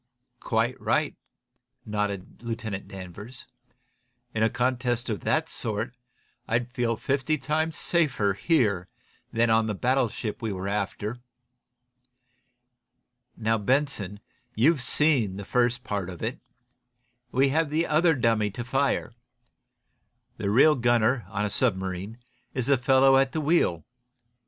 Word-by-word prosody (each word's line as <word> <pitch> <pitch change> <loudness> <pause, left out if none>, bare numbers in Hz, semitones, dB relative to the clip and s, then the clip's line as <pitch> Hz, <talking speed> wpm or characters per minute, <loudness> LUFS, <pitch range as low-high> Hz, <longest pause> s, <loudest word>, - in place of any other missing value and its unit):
"Quite - - -1
right," - - +1 0.7
nodded 105 -2 -3
Lieutenant 115 -4 -5
Danvers. 100 +5 -9 0.9
"In 110 - -1
a 110 - +4
contest 125 -1 -1
of 105 - -2
that 155 +1 0
sort 115 -2 -3 0.5
I'd 120 +1 0
feel 120 -3 -1
fifty 140 +5 0
times 155 +3 -1
safer 130 - +1
here 100 - +1 0.4
than 115 0 +2
on 110 0 +3
the 105 - -2
battleship 120 -2 -1
we 110 -2 -2
were 95 0 -4
after. 105 +3 -3 2.2
Now, 115 0 +1
Benson, 105 -4 0 0.4
you've 140 +6 +3
seen 130 -7 +2
the 100 - -6
first 125 +2 +1
part 100 -6 -3
of 90 +1 -8
it. 115 +3 -3 0.9
We 135 +2 +3
have 160 +2 +1
the 160 +3 +1
other 160 +1 +3
dummy 115 -4 +2
to 120 +4 -6
fire. 135 -1 0 1.2
The 100 - -2
real 135 +9 +6
gunner, 120 -3 +2
on 105 +1 -1
a - - -1
submarine, 95 -2 -1 0.4
is 125 -2 -1
the 140 +1 +4
fellow 135 +1 +5
at 135 -1 +2
the 155 - -1
wheel. 145 - +1
120 Hz, 125 wpm, -26 LUFS, 105-135 Hz, 2.2 s, real